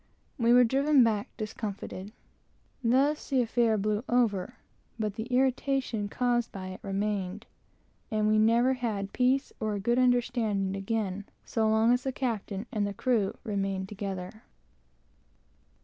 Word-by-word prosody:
We 235 0 +3
were 245 +1 +7
driven 275 +3 +4
back 215 -3 0
discomforted. 210 -2 -5 0.7
Thus 275 +6 +2
the 265 -3 +3
affair 230 -1 +2
blew 210 +2 0
over, 225 -7 +1 0.4
but 215 -3 -2
the 220 +2 -5
irritation 255 -3 0
caused 240 +1 0
by 185 -1 -6
it 185 - -8
remained; 200 0 -2 0.6
and 215 -1 +1
we 215 0 +4
never 235 +4 +4
had 215 -6 -3
peace 260 +2 +1
or 215 -1 -1
a - - -3
good 235 +5 +1
understanding 235 -6 +1
again 200 -1 -2 0.2
so 220 -1 +1
long 220 +2 +4
as 250 - +1
the 265 - -2
captain 225 -5 -3
and 205 -2 -2
crew 225 -7 +1
remained 195 -3 -2
together. 195 0 -6
220 Hz, 135 wpm, -29 LUFS, 200-245 Hz, 0.7 s, were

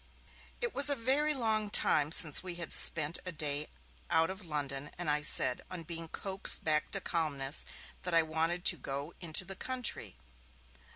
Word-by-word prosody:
It 480 -2 -3
was 280 +1 +4
a 285 - +1
very 280 +5 0
long 220 -4 0
time 150 -6 +2
since 155 -3 +6
we 180 -2 -6
had 170 -1 -6
spent 155 0 +2
a 185 - -5
day 150 -2 -2 0.4
out 165 +2 +2
of 190 +1 -10
London, 145 -3 -4
and 175 -1 -6
I 150 0 0
said, 125 -3 +3
on 180 -2 -7
being 165 0 -6
coaxed 195 +3 -1
back 155 -1 0
to 195 - +3
calmness, 150 -6 0 0.4
that 180 -2 -1
I 165 - +5
wanted 165 +3 -2
'to 175 - +7
go 140 +4 -6
into 170 +1 +2
the 195 +1 -6
country'. 250 - -5
165 Hz, 175 wpm, -32 LUFS, 150-195 Hz, 0.4 s, to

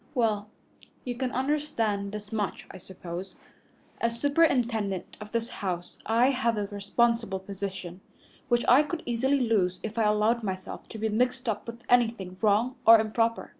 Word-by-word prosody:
"Well, 215 -4 +1 0.6
you 250 - -2
can 250 +1 -2
understand 245 -8 -1
this 210 0 -7
much, 210 -3 -2
I - - -10
suppose. 185 0 -8 0.6
As 230 0 -1
superintendent 240 - +1
of 210 0 -9
this 230 0 -1
house 180 -3 -4
I 235 +4 +4
have 235 -4 0
a 205 - 0
responsible 215 +1 0
position, 190 -2 -6 0.5
which 240 -1 +2
I 255 +4 +7
could 315 +2 -4
easily 260 +4 +1
lose 200 -7 +1
if 220 +1 -4
I 220 - +3
allowed 210 +3 +2
myself 190 -3 -5
to - - -7
be 220 +1 -1
mixed 250 +3 0
up 215 0 -2
with 235 +1 -8
anything 225 -7 +2
wrong 220 +5 +2
or 225 0 +9
improper. 225 +1 0
225 Hz, 160 wpm, -28 LUFS, 200-240 Hz, 0.6 s, or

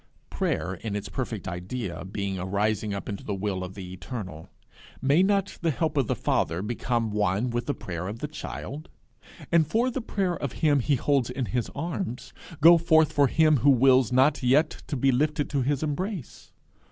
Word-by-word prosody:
Prayer 80 +4 -1
in 100 +3 -5
its 105 - -4
perfect - - -4
idea 90 0 -5
being 95 0 -4
a - - -3
rising 105 +2 0
up 100 -1 -5
into 100 - -5
the 100 - -3
will 95 -1 -2
of 90 0 -7
the 90 -2 -8
Eternal, 95 -5 -7 0.5
may 140 +6 +3
not 200 0 +1
the 170 - +1
help 155 +1 -1
of 135 -5 +1
the - - 0
Father 85 +4 0
become 115 0 -1
one 105 +3 0
with 120 0 -2
the 145 - -1
prayer 90 -4 -5
of 105 +3 -5
the 150 - -4
child, 150 0 -7 0.6
and 165 -3 +4
for 235 +10 +1
the 260 - -3
prayer 195 -6 -1
of 140 -5 -4
him 150 -3 +2
he 140 +3 +2
holds 135 -1 +1
in 125 0 -2
his 115 +4 -2
arms, 160 -3 -4 0.3
go 170 +2 +8
forth 160 -2 +4
for 145 -1 +4
him 155 +1 +4
who 135 +4 +3
wills 130 -2 +5
not 135 +4 +3
yet 140 +5 +3 0.2
to 145 - -3
be 135 +2 +3
lifted 145 +3 0
to 140 -2 +1
his 140 +3 0
embrace? 175 - -4
125 Hz, 195 wpm, -26 LUFS, 100-150 Hz, 0.6 s, go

